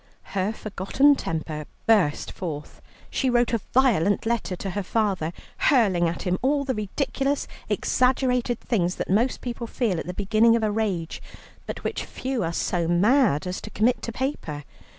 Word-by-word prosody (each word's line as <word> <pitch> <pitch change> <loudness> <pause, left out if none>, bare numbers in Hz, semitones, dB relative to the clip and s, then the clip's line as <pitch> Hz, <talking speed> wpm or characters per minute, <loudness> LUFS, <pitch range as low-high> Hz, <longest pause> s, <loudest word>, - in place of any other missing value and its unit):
Her 195 +1 +1
forgotten 215 +7 +2
temper 155 - -4 0.2
burst 200 -10 +3
forth. 150 -5 -6 0.3
She 265 - +1
wrote 240 -1 +2
a 230 - +1
violent 220 -8 +3
letter 225 -5 -1
to 195 +1 -5
her 205 - -2
father, 195 -5 0 0.3
hurling 195 - +3
at 170 - -5
him 180 0 0
all 280 +2 +2
the 265 -1 -1
ridiculous 270 +6 -1 0.2
exaggerated 250 -2 +1
things 180 -6 0
that - - -3
most 235 +6 +2
people 240 -1 -4
feel 220 -8 0
at - - -6
the 180 - -5
beginning 215 +3 +4
of 230 - 0
a 215 - +1
rage, 200 -7 -2 0.5
but - - -6
which - - -2
few 260 -4 -3
are 165 - -1
so 170 0 -1
mad 190 - +3
as 180 0 -4
to - - -8
commit 235 +4 +1
to 230 - -4
paper. 220 - -3
215 Hz, 170 wpm, -25 LUFS, 180-245 Hz, 0.5 s, beginning